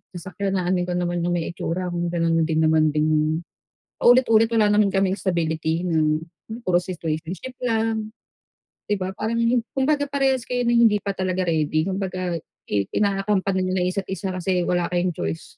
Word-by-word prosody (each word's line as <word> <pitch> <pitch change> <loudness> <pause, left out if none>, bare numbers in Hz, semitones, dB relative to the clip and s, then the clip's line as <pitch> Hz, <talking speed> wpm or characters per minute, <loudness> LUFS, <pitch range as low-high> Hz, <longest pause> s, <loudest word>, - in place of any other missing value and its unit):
sasakyan, 190 +3 -3
aanhin 180 -1 0
ko 180 - -2
naman 175 0 -1
yung 175 +1 0
may 170 0 -2
itsura 175 +1 -3
kung 175 0 -2
gano'n 165 -1 +1
din 160 -1 +1
naman 155 0 +4
ding 155 +2 +1 0.5
paulit-ulit 240 -2 +5
wala 220 -2 +4
naman 205 -1 +3
kaming 195 -1 +1
stability 165 -3 -1
na, 160 -2 +2 0.2
hmm, 175 +8 -11
puro 175 - +4
situationship 175 +7 -5
lang, 225 -2 -1 0.8
di 205 - +1
ba, 190 0 -4
Parang 220 +3 -2 0.4
kumbaga 285 +1 +1
parehas 270 -3 0
kayo 245 0 0
na 235 - +2
hindi 235 -3 +5
pa 200 - -1
talaga 185 -1 -1
ready, 155 -2 +1
kumbaga 185 -3 -3 0.3
i 100 -2 -1
ina-accompany 195 -1 +1
niyo 185 - -1
lang 180 - +1
yung 180 - 0
isa't 195 -2 -3
isa 190 0 -3
kasi 185 0 0
wala 175 -1 +1
kayong 175 0 0
choice. 80 - -4
185 Hz, 175 wpm, -23 LUFS, 170-210 Hz, 0.8 s, paulit-ulit